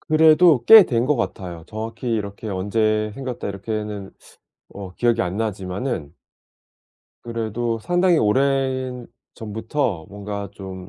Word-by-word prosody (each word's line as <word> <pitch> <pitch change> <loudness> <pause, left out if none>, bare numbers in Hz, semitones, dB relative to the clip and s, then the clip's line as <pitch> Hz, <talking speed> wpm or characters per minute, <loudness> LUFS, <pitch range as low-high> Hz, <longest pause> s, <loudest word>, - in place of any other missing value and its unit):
그래도 155 -3 +5
꽤 220 -2 +10
된 120 -5 0
것 150 - +3
같아요. 90 -8 -4
정확히 115 +3 -6
이렇게 105 0 -4
언제 105 +2 0
생겼다 130 -3 -5
이렇게는 105 0 -5 0.6
어 95 -2 -8
기억이 120 +1 +1
안 90 +3 -3
나지만은 95 - -3 1.1
그래도 115 0 -3
상당히 175 +6 +2
오래전부터 125 - -2
뭔가 100 0 -6
좀 95 -2 -9
110 Hz, 260 characters per minute, -22 LUFS, 100-130 Hz, 1.1 s, 꽤